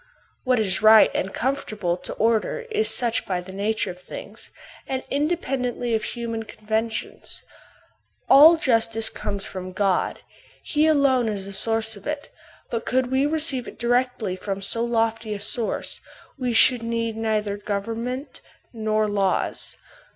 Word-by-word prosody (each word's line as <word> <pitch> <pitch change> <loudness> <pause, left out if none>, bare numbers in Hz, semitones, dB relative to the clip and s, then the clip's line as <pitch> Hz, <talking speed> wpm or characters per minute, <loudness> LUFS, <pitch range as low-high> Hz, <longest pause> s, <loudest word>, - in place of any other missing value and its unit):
What 255 -2 +3
is 200 -1 +1
right 220 0 +7
and 190 - -1
conformable 215 -9 -1
to 180 - -8
order 225 - +1
is 435 0 +1
such 235 -2 +1
by 185 -2 -1
the 180 +1 -9
nature 205 +1 -1
of 180 0 -13
things, - - -9 0.4
and 260 -1 -2
independently 270 -6 -1
of 220 - +1
human 230 -2 -4
conven 220 +1 -2
tions. - - -5 0.8
All 310 +5 +9
justice 225 -5 +1
comes 200 -1 -4
from 185 -1 -7
God, 195 -1 0 0.4
he 305 +1 +2
alone 275 -6 +3
is 200 -2 -3
the 200 - -7
source 225 +2 +1
of 200 - -11
it: 295 -1 -4 0.4
but 230 -1 -2
could 255 0 0
we 265 +2 +3
receive 300 -5 0
it - - -10
direct 245 +1 +1 0.2
from 195 0 -3
so 230 +4 0
lofty 225 -2 0
a - - -6
source, 225 +3 -2 0.3
we 255 -3 -2
should 235 +1 +6
need 230 -1 -2
neither 215 -2 -1
government 230 +6 -4 0.3
nor 215 -1 0
laws. 200 -2 0
225 Hz, 150 wpm, -24 LUFS, 210-255 Hz, 0.8 s, All